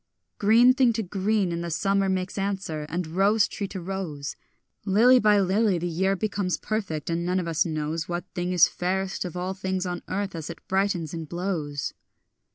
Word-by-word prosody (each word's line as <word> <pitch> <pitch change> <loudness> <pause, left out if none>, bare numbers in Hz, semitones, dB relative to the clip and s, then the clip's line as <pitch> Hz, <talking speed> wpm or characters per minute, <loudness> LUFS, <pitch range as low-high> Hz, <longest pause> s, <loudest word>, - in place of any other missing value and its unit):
Green 230 +5 +6
thing 255 -2 +3
to 225 0 -1
green 195 0 0
in 170 0 -2
the 170 - -4
summer 195 +4 +1
makes 185 0 -1
answer, 190 -6 -3
and 175 +2 -2
rose 195 +6 +3
tree 200 - -4
to 190 - -6
rose; 175 -6 -5 0.5
Lily 225 +6 +5
by 210 -2 +4
lily 195 +1 +2
the 170 - -3
year 190 +3 +1
becomes 200 -2 -1
perfect; 195 -9 -3
and 165 +1 -1
none 180 +2 +1
of 175 - -3
us 165 0 +1
knows 155 +1 -3
What 175 0 -3
thing 180 0 -2
is 180 -3 +6
fairest 190 +2 -2
of 180 0 -5
all 185 +1 -2
things 190 -1 -2
on 175 -1 -3
earth 195 0 -2
as 160 -2 -6
it 170 - -10
brightens 190 -5 0
and 165 -2 -6
blows. 170 -6 -3
185 Hz, 190 wpm, -26 LUFS, 170-200 Hz, 0.5 s, Green